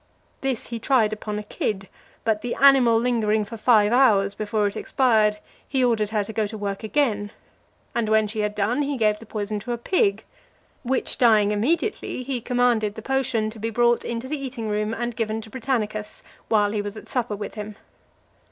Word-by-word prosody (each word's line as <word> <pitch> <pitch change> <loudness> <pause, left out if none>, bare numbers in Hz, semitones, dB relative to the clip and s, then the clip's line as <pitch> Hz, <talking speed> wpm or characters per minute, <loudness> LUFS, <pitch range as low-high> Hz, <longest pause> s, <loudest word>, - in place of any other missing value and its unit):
This 265 -4 -2
he 230 -1 -4
tried 225 -3 +2
upon 210 0 -4
a 210 - -4
kid: 195 -2 -3 0.4
but 220 -2 +1
the 245 - -3
animal 265 -4 +6
lingering 220 -3 +1
for 230 - -8
five 215 -1 +4
hours 205 -6 +4
before 210 0 -1
it 200 - -1
expired, 220 -5 +2 0.3
he 265 -2 +1
ordered 225 -4 +2
her 210 -1 0
to 220 - -8
go 215 -1 0
to 220 +1 -7
work 200 -1 -4
again; 215 -4 0 0.6
and 230 -2 0
when 220 0 +3
she 215 +1 -5
had 210 0 -1
done, 215 +7 0
he 285 -1 -1
gave 210 -2 +2
the 225 - -13
poison 210 -1 -3
to 240 +4 -4
a - - -2
pig, 390 - +1 0.6
which 260 0 -1
dying 215 -4 +5
immediately, 290 - -1
he 250 -2 -3
commanded 240 -4 +1
the 220 - -8
potion 235 -5 0
to 220 - -11
be 225 +2 -2
brought 240 +1 +2
into 235 +2 -4
the 285 0 -4
eating 245 -5 -4
room 210 +1 -1
and 240 0 -3
given 220 -1 -2
to 220 -1 -11
Britannicus, 220 -5 -3 0.3
while 205 -2 +3
he 210 -1 -1
was 205 +1 -6
at - - -11
supper 240 -4 -1
with 205 0 -6
him. 210 -1 -7
220 Hz, 200 wpm, -24 LUFS, 210-245 Hz, 0.6 s, animal